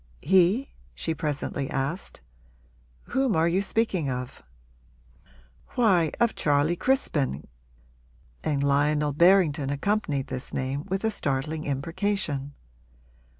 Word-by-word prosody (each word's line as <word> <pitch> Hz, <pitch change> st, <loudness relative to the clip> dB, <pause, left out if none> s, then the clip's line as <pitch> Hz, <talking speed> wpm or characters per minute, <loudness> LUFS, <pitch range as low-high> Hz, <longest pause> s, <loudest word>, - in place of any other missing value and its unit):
'He?' 190 Hz, -, +3 dB, 0.2 s
she 160 Hz, -, -1 dB
presently 145 Hz, -2 st, -3 dB
asked. 150 Hz, +5 st, -3 dB, 0.9 s
'Whom 265 Hz, -5 st, +1 dB
are 160 Hz, +1 st, +3 dB
you 180 Hz, +3 st, +2 dB
speaking 200 Hz, -8 st, 0 dB
of?' 125 Hz, 0 st, -5 dB, 1.3 s
'Why, 185 Hz, -10 st, +3 dB
of 235 Hz, -1 st, +3 dB
Charley 145 Hz, +3 st, +2 dB
Crispin, 160 Hz, -, 0 dB
G -, -, -21 dB, 0.6 s
' -, -, -32 dB
And 145 Hz, -2 st, 0 dB
Lionel 145 Hz, +1 st, +2 dB
Berrington 165 Hz, -4 st, +4 dB
accompanied 145 Hz, -2 st, 0 dB
this 130 Hz, -2 st, -6 dB
name 135 Hz, +2 st, -2 dB
with 190 Hz, +2 st, -2 dB
a 220 Hz, -, +1 dB
startling 155 Hz, -3 st, -2 dB
imprecation. 145 Hz, -1 st, -2 dB
150 Hz, 110 wpm, -26 LUFS, 140-190 Hz, 1.3 s, Berrington